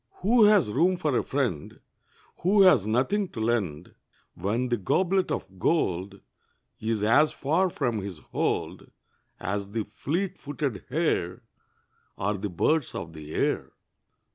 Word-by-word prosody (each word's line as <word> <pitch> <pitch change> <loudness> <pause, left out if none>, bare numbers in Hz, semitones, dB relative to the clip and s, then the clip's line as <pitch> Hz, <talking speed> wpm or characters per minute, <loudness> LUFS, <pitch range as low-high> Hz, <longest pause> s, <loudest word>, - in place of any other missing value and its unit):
Who 225 +2 +5
has 205 - +4
room 180 - +2
for 150 -6 0
a - - +3
friend 125 - -2 0.6
Who 195 +3 +4
has 145 - +5
nothing 160 - +1
to - - -6
lend, 100 -9 -1 0.4
When 115 +8 -1
the 120 - +1
goblet 185 - +1
of 95 -1 -5
gold 95 - 0 0.6
Is 110 -1 -1
as 145 +8 +4
far 165 +7 +1
from 120 -9 -1
his 95 -3 -6
hold - - -3 0.5
As 100 +1 -3
the 115 -1 -1
fleet 170 - -3
footed 140 -7 -4
hare, 120 - -1 0.7
Or 105 +3 0
the 100 +1 -4
birds 150 - 0
of 80 -1 -6
the 75 -1 -9
air. - - -1
120 Hz, 140 wpm, -27 LUFS, 100-165 Hz, 0.7 s, Who